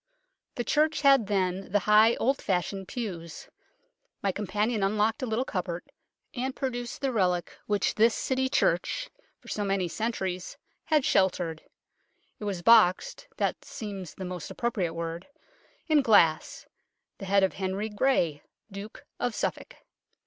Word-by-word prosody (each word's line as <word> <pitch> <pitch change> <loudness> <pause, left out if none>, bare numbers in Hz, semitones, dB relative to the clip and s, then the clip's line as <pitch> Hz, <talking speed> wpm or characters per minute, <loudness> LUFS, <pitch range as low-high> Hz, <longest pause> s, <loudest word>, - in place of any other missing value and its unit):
The 240 - -2
church 305 +5 +1
had 275 -6 +5
then 190 -2 -1
the 205 - +4
high 215 +2 +6
old 270 +3 0
fashioned 190 +1 -2
pews. 175 -10 -6 0.7
My 200 - +2
companion 210 +3 -1
unlocked 215 +5 +1
a 255 - -2
little 225 +3 0
cupboard, 175 -5 -3 0.5
and 260 0 -3
pro 265 -1 -2
duced 240 0 -6
the 270 -1 0
relic 180 -6 0
which 205 -2 +1
this 225 +1 +4
City 260 0 0
church - - 0 0.3
for - - -21
so 210 - -2
many 195 -2 0
centuries 190 -2 -3 0.3
had 305 -4 +2
sheltered. 175 -4 +1 0.8
It 210 - -6
was 190 -4 -3
boxed 225 - +4
(that - - -1
seems 195 -5 -7
the 190 - -6
most 180 -2 -6
appropriate 195 -9 -2
word) 165 +1 -5 0.6
in 310 -3 +4
glass 170 - +3 0.5
the 195 - -6
head 195 +1 +3
of 190 - +2
Henry 190 +2 -2
Grey, 205 - +1 0.3
Duke 200 +2 -9
of 245 -2 -1
Suffolk. - - -3
205 Hz, 145 wpm, -28 LUFS, 185-235 Hz, 0.8 s, high